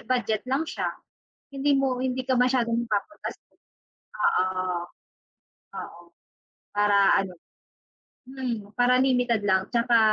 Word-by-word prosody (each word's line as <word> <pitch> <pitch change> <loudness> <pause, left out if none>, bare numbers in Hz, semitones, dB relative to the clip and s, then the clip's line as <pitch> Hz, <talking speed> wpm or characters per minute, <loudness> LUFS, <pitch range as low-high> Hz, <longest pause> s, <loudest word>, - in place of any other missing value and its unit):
budget 220 -4 -1
lang 275 +5 +1
siya, - - -3 0.7
hindi 285 +1 +1
mo 265 -2 +1
hindi 260 0 -1
ka 260 - +2
masyadong 245 -2 +2
mapapagastos. 230 +7 -4 0.7
Oo, 185 0 +1 1.1
oo, - - -8 0.7
para 205 -1 +4
ano, 185 - -9 0.9
mm, 245 -6 -5
para 245 +2 +3
limited 245 -4 +2
lang. 190 -1 +2
Tsaka, 235 -1 +3
245 Hz, 105 wpm, -26 LUFS, 205-260 Hz, 1.1 s, para